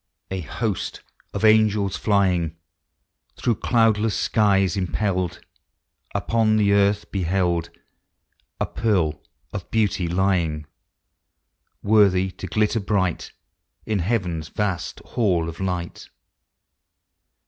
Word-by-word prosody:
A 95 Hz, -, -2 dB
host 100 Hz, +4 st, -3 dB, 0.3 s
of -, -, -1 dB
angels 110 Hz, -3 st, +3 dB
living. 90 Hz, -6 st, +2 dB, 0.8 s
Through 120 Hz, -, +1 dB
cloudless 115 Hz, -2 st, +2 dB
skies 95 Hz, -4 st, +2 dB
impelled, 95 Hz, -2 st, -1 dB, 0.7 s
Upon 110 Hz, -2 st, +2 dB
the 100 Hz, -1 st, +3 dB
earth 100 Hz, +1 st, +2 dB
beheld 90 Hz, -2 st, 0 dB, 0.9 s
A -, -, +1 dB
pearl 90 Hz, -9 st, 0 dB, 0.3 s
of 95 Hz, -3 st, -6 dB
beauty 105 Hz, -5 st, +1 dB
lying, 85 Hz, -4 st, 0 dB, 1.2 s
Worthy 100 Hz, -3 st, +4 dB
to 95 Hz, +1 st, -8 dB
glitter 105 Hz, +4 st, +1 dB
bright 95 Hz, -4 st, -1 dB, 0.5 s
In 110 Hz, -2 st, 0 dB
heaven's 90 Hz, -5 st, -1 dB
vast 95 Hz, -1 st, -3 dB
hall 90 Hz, -9 st, 0 dB
of 85 Hz, 0 st, -7 dB
light. 90 Hz, -2 st, -4 dB
95 Hz, 95 wpm, -23 LUFS, 90-105 Hz, 1.2 s, Worthy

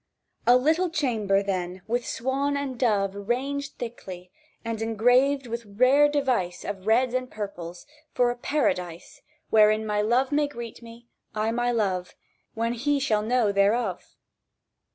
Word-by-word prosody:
"A 245 Hz, +1 st, +7 dB
little 320 Hz, +7 st, +2 dB
chamber, 220 Hz, -, 0 dB
then, 185 Hz, -2 st, -3 dB
with 240 Hz, +2 st, -2 dB
swan 275 Hz, +3 st, -1 dB
and 280 Hz, -2 st, -3 dB
dove 200 Hz, -6 st, +1 dB
Ranged 265 Hz, +7 st, -3 dB
thickly, 185 Hz, -6 st, -8 dB, 0.3 s
and 230 Hz, -1 st, -3 dB
engrailed 245 Hz, +5 st, +2 dB
with 235 Hz, 0 st, -5 dB
rare 255 Hz, +8 st, +4 dB
device 250 Hz, -12 st, -1 dB
Of 195 Hz, 0 st, -6 dB
reds 240 Hz, +3 st, +3 dB
and 255 Hz, 0 st, -2 dB
purples, 180 Hz, -5 st, -7 dB, 0.3 s
for 245 Hz, -1 st, +2 dB
a -, -, -5 dB
Paradise 180 Hz, -, -2 dB, 0.3 s
Wherein 215 Hz, 0 st, +4 dB
my 210 Hz, -1 st, 0 dB
Love 245 Hz, +6 st, +1 dB
may 295 Hz, 0 st, +2 dB
greet 235 Hz, -5 st, -8 dB
me, 235 Hz, 0 st, -13 dB, 0.3 s
I 215 Hz, +1 st, 0 dB
my 240 Hz, +1 st, 0 dB
Love, 190 Hz, -6 st, -1 dB, 0.4 s
When 230 Hz, +1 st, -1 dB
he 280 Hz, +4 st, 0 dB
shall 220 Hz, -6 st, +1 dB
know 225 Hz, -1 st, +1 dB
thereof?" 200 Hz, 0 st, 0 dB
230 Hz, 145 wpm, -26 LUFS, 205-260 Hz, 0.4 s, A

